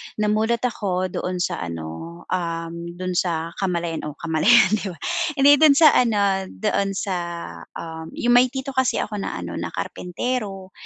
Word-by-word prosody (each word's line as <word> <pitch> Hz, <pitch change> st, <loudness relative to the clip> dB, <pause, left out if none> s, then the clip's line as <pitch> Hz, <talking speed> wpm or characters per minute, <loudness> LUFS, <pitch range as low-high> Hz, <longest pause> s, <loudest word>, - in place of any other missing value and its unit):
namulat 215 Hz, +3 st, +1 dB
ako 185 Hz, -6 st, -1 dB
doon 180 Hz, 0 st, -3 dB
sa -, -, -2 dB
ano, 85 Hz, -, -7 dB
um, 165 Hz, -2 st, -2 dB, 0.2 s
dun 185 Hz, 0 st, -3 dB
sa 170 Hz, -2 st, -1 dB
kamalayan 170 Hz, -4 st, -2 dB
o 150 Hz, -, -7 dB
kamalayan 185 Hz, +8 st, +4 dB
di 210 Hz, -2 st, 0 dB
ba, 180 Hz, -, -6 dB, 0.4 s
hindi 285 Hz, +1 st, +6 dB
dun 305 Hz, -3 st, +7 dB
sa 310 Hz, -1 st, +8 dB
ano 200 Hz, -5 st, +2 dB
doon 200 Hz, -2 st, -1 dB
sa, 190 Hz, -1 st, -2 dB, 0.6 s
um, 160 Hz, -1 st, -7 dB
yung 240 Hz, -, +1 dB
may 255 Hz, -, +4 dB
tito 265 Hz, +2 st, -5 dB
kasi 260 Hz, -2 st, +1 dB
ako 210 Hz, -1 st, -5 dB
na -, -, -4 dB
ano -, -, -5 dB
na -, -, -3 dB
karpentero 195 Hz, -1 st, -4 dB
190 Hz, 160 wpm, -23 LUFS, 170-230 Hz, 0.6 s, sa